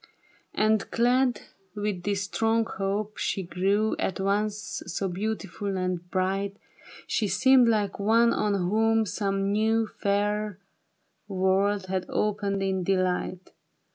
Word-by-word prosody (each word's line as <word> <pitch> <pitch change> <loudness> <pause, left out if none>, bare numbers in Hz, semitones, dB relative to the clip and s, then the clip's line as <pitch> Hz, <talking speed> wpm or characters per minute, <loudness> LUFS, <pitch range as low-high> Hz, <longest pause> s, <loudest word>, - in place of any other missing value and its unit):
And 215 -1 +2
clad 245 0 +2 0.3
with 205 -3 -2
this 200 +1 -1
strong 225 +3 +1
hope, 205 +1 -3
she 195 -3 -1
grev/ 195 +5 +1
At 190 - -2
once 210 +2 -1
so 185 +3 -2
beautiful 200 0 -3
and 180 -1 -3
bright, 195 +2 -1 0.5
She 215 - 0
seemed 260 +3 +5
like 210 -4 +1
one 230 +3 +4
on 205 -1 +1
whom 220 +4 +2
some 195 -1 -1
new 220 +2 +2
Fair 205 0 -1 0.7
world 195 +1 +1
had 185 0 -3
opened 200 -2 -1
in 190 -1 0
delight. 185 -1 -1
200 Hz, 120 wpm, -27 LUFS, 190-215 Hz, 0.7 s, seemed